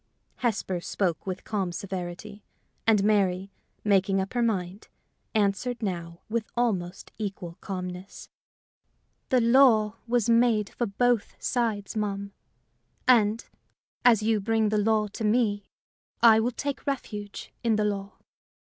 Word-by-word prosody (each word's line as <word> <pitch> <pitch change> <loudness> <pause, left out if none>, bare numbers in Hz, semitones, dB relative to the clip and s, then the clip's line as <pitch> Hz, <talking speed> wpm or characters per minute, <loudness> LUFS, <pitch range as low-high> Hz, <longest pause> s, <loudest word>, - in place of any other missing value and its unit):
Hesper 210 -7 -1
spoke 180 0 -2
with 185 0 -4
calm 195 -4 -2
severity, 190 +3 -6 0.4
and 215 -3 +4
Mary, 195 -2 +1 0.3
making 195 -1 +3
up 190 0 -3
her 245 - +1
mind, 195 -4 -2 0.5
answered 220 +4 0
now 170 -3 -4
with 225 0 -2
almost 190 -7 -1
equal 190 -4 -5
calmness. 180 0 -6 1.0
"The 255 - +4
law 230 -3 +5
was 240 -2 +1
made 230 -3 +3
for 240 - -2
both 235 +2 +1
sides, 225 -4 -1
ma'am; 200 -2 -3 0.7
and, 225 -3 +4 0.6
as 230 -4 +5
you 220 -1 +2
bring 220 +1 +1
the 210 0 +1
law 215 0 +2
to 210 - -6
me, 210 -2 +1 0.6
I 225 -2 +8
will 230 +2 +1
take 280 +3 -5
refuge 210 -7 -5
in 230 -2 +3
the 210 0 +1
law. 200 -1 -3
210 Hz, 130 wpm, -27 LUFS, 195-230 Hz, 1.0 s, I